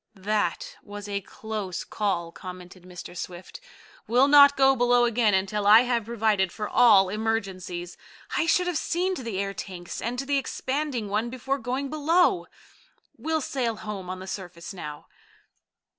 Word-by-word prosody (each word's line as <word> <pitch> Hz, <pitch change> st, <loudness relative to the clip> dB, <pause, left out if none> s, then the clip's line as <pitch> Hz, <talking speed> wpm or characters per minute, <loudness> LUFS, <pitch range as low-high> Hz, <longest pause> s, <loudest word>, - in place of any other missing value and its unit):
"That 215 Hz, -, -2 dB
was 205 Hz, 0 st, -9 dB
a 200 Hz, -1 st, -2 dB
close 205 Hz, -2 st, -5 dB
call," 175 Hz, -5 st, -2 dB
commented 180 Hz, 0 st, -10 dB
Mr. 180 Hz, -1 st, -10 dB
Swift. 180 Hz, -, -8 dB, 0.5 s
"We'll 250 Hz, +4 st, +4 dB
not 285 Hz, -1 st, +7 dB
go 270 Hz, 0 st, +5 dB
below 245 Hz, 0 st, +4 dB
again 230 Hz, -3 st, +2 dB
until 200 Hz, +2 st, 0 dB
I 215 Hz, +2 st, +9 dB
have 240 Hz, -3 st, 0 dB
provided 215 Hz, -5 st, +1 dB
for 210 Hz, -1 st, -4 dB
all 210 Hz, -6 st, +5 dB
emergencies. 190 Hz, -5 st, -3 dB, 0.4 s
I 330 Hz, -, +1 dB
should 360 Hz, +2 st, +3 dB
have 355 Hz, -3 st, -1 dB
seen 365 Hz, +2 st, -1 dB
to 300 Hz, -, -5 dB
the 230 Hz, -5 st, -4 dB
air 195 Hz, 0 st, -2 dB
tanks 180 Hz, -3 st, -7 dB
and 235 Hz, +3 st, -3 dB
the 275 Hz, +2 st, 0 dB
expanding 265 Hz, -3 st, -3 dB
one 215 Hz, +4 st, -1 dB
before 265 Hz, +3 st, -3 dB
going 260 Hz, +3 st, -3 dB
below. 335 Hz, +5 st, +2 dB, 0.7 s
We'll 320 Hz, 0 st, -1 dB
sail 245 Hz, -4 st, -2 dB
home 210 Hz, -4 st, -7 dB
on 185 Hz, -, -4 dB
the 185 Hz, -, -9 dB
surface 180 Hz, -2 st, -7 dB
now." 150 Hz, -5 st, -8 dB
220 Hz, 160 wpm, -26 LUFS, 190-265 Hz, 0.7 s, I